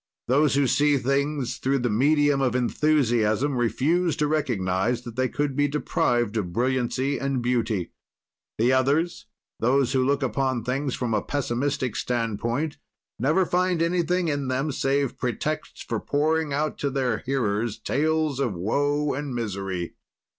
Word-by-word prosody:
Those, 140 Hz, +3 st, +3 dB
who 140 Hz, 0 st, +3 dB
see 145 Hz, +2 st, +3 dB
things 140 Hz, -1 st, -1 dB
through 135 Hz, +1 st, +1 dB
the 125 Hz, -2 st, 0 dB
medium 145 Hz, +4 st, +3 dB
of 125 Hz, -2 st, +1 dB
enthusiasm 125 Hz, -1 st, +2 dB
refuse 145 Hz, -, +1 dB
to 150 Hz, -, 0 dB
recognize 120 Hz, -6 st, 0 dB
that 120 Hz, -2 st, -8 dB
they 130 Hz, 0 st, +1 dB
could 145 Hz, -2 st, -2 dB
be 145 Hz, +1 st, +2 dB
deprived 120 Hz, -6 st, 0 dB
of 90 Hz, -5 st, -2 dB
brilliancy 130 Hz, +4 st, 0 dB
and 135 Hz, -1 st, -1 dB
beauty. 115 Hz, -6 st, -1 dB, 0.7 s
The 120 Hz, +4 st, +3 dB
others, 145 Hz, +6 st, +1 dB, 0.3 s
those 130 Hz, +2 st, +2 dB
who 130 Hz, -1 st, +3 dB
look 140 Hz, +2 st, +1 dB
upon 130 Hz, 0 st, 0 dB
things 130 Hz, +2 st, -1 dB
from 120 Hz, -3 st, -2 dB
a 105 Hz, -, +2 dB
pessimistic 130 Hz, -3 st, -2 dB
standpoint, 120 Hz, +6 st, -2 dB, 0.4 s
never 155 Hz, -, +2 dB
find 180 Hz, 0 st, +1 dB
anything 175 Hz, +1 st, +1 dB
in 145 Hz, -3 st, -1 dB
them 135 Hz, +4 st, -1 dB
save 135 Hz, 0 st, 0 dB
pretexts 150 Hz, +5 st, -3 dB
for -, -, -2 dB
pouring 155 Hz, +1 st, 0 dB
out 150 Hz, +2 st, -1 dB
to 140 Hz, -, 0 dB
their 130 Hz, -5 st, 0 dB
hearers 115 Hz, -5 st, -1 dB
tales 155 Hz, -1 st, 0 dB
of 120 Hz, -8 st, 0 dB
woe 145 Hz, +10 st, 0 dB
and 140 Hz, -1 st, -4 dB
misery. 95 Hz, -6 st, -3 dB
135 Hz, 145 wpm, -25 LUFS, 120-145 Hz, 0.7 s, Those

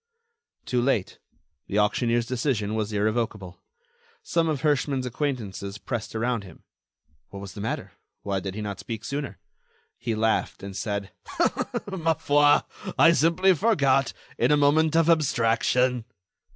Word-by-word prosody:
Too 125 Hz, -1 st, 0 dB
late; 120 Hz, -7 st, 0 dB, 0.5 s
the 100 Hz, -, -2 dB
auctioneer's 115 Hz, +3 st, +2 dB
decision 115 Hz, -4 st, -1 dB
was 110 Hz, -1 st, -2 dB
irrevocable. 105 Hz, -3 st, -2 dB, 0.6 s
Some 165 Hz, -1 st, +1 dB
of 150 Hz, -4 st, -1 dB
Herschmann's 140 Hz, -3 st, +1 dB
acquaintances 115 Hz, -7 st, -3 dB
pressed 115 Hz, +1 st, -5 dB
around 115 Hz, -1 st, -1 dB
him. 90 Hz, -4 st, -14 dB, 0.7 s
What 100 Hz, -, -8 dB
was 100 Hz, -1 st, -8 dB
the 100 Hz, -, -7 dB
matter? 110 Hz, -, -3 dB, 0.3 s
Why 100 Hz, -1 st, -1 dB
did 95 Hz, +1 st, -5 dB
he 105 Hz, -, -4 dB
not 100 Hz, -2 st, -5 dB
speak 115 Hz, -2 st, -6 dB
sooner? 140 Hz, -8 st, -4 dB, 0.6 s
He 115 Hz, -2 st, -2 dB
laughed, 110 Hz, -2 st, 0 dB
and 100 Hz, -1 st, -7 dB
said: 100 Hz, -2 st, -3 dB, 0.8 s
"Ma 165 Hz, -5 st, 0 dB
foi! 145 Hz, -1 st, +4 dB, 0.4 s
I 165 Hz, -, +7 dB
simply 170 Hz, +4 st, +4 dB
forgot—in 140 Hz, -9 st, +1 dB
a 150 Hz, -, +5 dB
moment 155 Hz, +2 st, +3 dB
of 165 Hz, -1 st, +4 dB
abstraction." 125 Hz, -5 st, +2 dB
120 Hz, 135 wpm, -25 LUFS, 105-145 Hz, 0.8 s, I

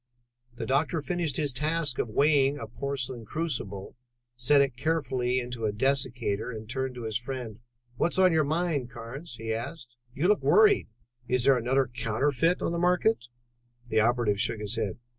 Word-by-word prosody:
The -, -, -4 dB
doctor 155 Hz, +5 st, +1 dB
finished 165 Hz, -2 st, -1 dB
his 145 Hz, -4 st, -1 dB
task 150 Hz, -1 st, 0 dB
of 120 Hz, -, -1 dB
weighing 140 Hz, +3 st, +3 dB
a 115 Hz, -, -5 dB
porcelain 130 Hz, +1 st, -4 dB
crucible, 110 Hz, -8 st, -4 dB, 0.4 s
set 125 Hz, +4 st, +4 dB
it 140 Hz, -3 st, +2 dB
carefully 130 Hz, -4 st, 0 dB
into 120 Hz, -2 st, -4 dB
a -, -, 0 dB
dessicator, 120 Hz, -3 st, 0 dB
and 110 Hz, -3 st, -7 dB
turned 130 Hz, +2 st, -3 dB
to 120 Hz, -, -7 dB
his 110 Hz, -1 st, -1 dB
friend. 120 Hz, -4 st, -6 dB, 0.4 s
"What's 170 Hz, -, 0 dB
on 185 Hz, -2 st, +5 dB
your 160 Hz, -1 st, +4 dB
mind, 155 Hz, -4 st, -1 dB
Carnes?" 120 Hz, +5 st, -8 dB
he 110 Hz, -1 st, -3 dB
asked. 120 Hz, +1 st, -6 dB, 0.2 s
"You 160 Hz, +6 st, +1 dB
look 210 Hz, +1 st, +3 dB
worried. 425 Hz, -2 st, +5 dB, 0.4 s
Is 125 Hz, 0 st, +1 dB
there 135 Hz, +1 st, +6 dB
another 130 Hz, +3 st, +2 dB
counterfeit 125 Hz, +7 st, 0 dB
on -, -, 0 dB
the 170 Hz, -, -1 dB
market?" 180 Hz, -, +2 dB, 0.6 s
The 110 Hz, -, +2 dB
operative 110 Hz, -3 st, +2 dB
shook 115 Hz, -, +1 dB
his 105 Hz, +1 st, -4 dB
head. 110 Hz, -5 st, -2 dB
130 Hz, 170 wpm, -28 LUFS, 115-150 Hz, 0.6 s, there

